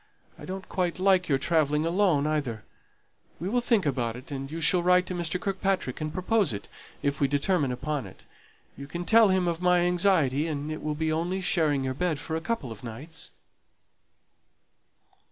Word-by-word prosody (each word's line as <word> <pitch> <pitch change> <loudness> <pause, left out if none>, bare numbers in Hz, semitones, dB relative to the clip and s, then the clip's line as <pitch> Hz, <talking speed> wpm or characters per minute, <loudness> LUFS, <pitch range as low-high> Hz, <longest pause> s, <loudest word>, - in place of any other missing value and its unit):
I - - -11
don't 190 +1 -6
quite 180 -3 -1
like 185 -1 +3
your 135 - +3
travelling 150 0 +1
alone 170 -4 +2
either. 145 -8 -2 0.8
We 175 - -3
will 245 +5 +1
think 230 -6 +2
about 120 -5 -1
it, 125 +4 -11
and 135 -1 -5
you 165 - -4
shall 180 +2 +3
write 180 +1 +4
to 185 - -4
Mr. 175 0 -1
Kirkpatrick, 190 -8 -1
and 155 0 -2
propose 185 - +1
it, 100 - -6 0.4
if 140 0 -1
we 140 - +4
determine 145 +1 +1
upon 135 -1 -3
it. 95 - -15 0.5
You 140 +1 -9
can 175 +4 -5
tell 225 +1 +6
him 185 -2 +2
of 170 0 -2
my 180 -1 +4
anxiety; 175 -5 +2
and 150 -1 -3
it 155 - -5
will 150 -1 -2
be 160 +1 0
only 175 +4 -1
sharing 155 -7 +1
your 130 0 -1
bed 170 +2 -1
for 160 +3 -4
a 160 - -2
couple 165 - -3
of 110 0 -10
nights." 140 +8 -6
160 Hz, 190 wpm, -27 LUFS, 140-180 Hz, 0.8 s, tell